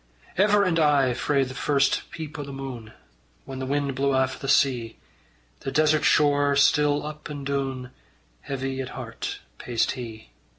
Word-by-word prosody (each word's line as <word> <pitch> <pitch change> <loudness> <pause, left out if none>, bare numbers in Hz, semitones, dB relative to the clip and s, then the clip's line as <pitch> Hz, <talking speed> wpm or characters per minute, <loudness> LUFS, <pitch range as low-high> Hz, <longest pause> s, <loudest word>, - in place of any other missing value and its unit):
Ever 205 +1 +4
and 175 -3 +1
aye 145 -5 +4
frae 140 +3 +1
first 135 +2 0
peep 160 -1 -7
o' - - -3
the 140 - -8
moon, 130 -5 -7 0.5
Whan 135 -1 -7
the 130 - -4
wind 140 0 0
blew 135 +1 +1
aff 130 0 +1
o' - - -17
the 135 - -6
sea, 125 -5 +2 0.6
The 135 - -4
desert 155 +1 +3
shore 145 -1 +4
still 145 +1 +3
up 150 0 -7
and 145 -2 -6
doon 135 -2 -3 0.5
Heavy 135 - -4
at 130 - -5
heart - - -6 0.2
paced 120 -2 0
he. 110 - -8
140 Hz, 165 wpm, -25 LUFS, 130-150 Hz, 0.6 s, Ever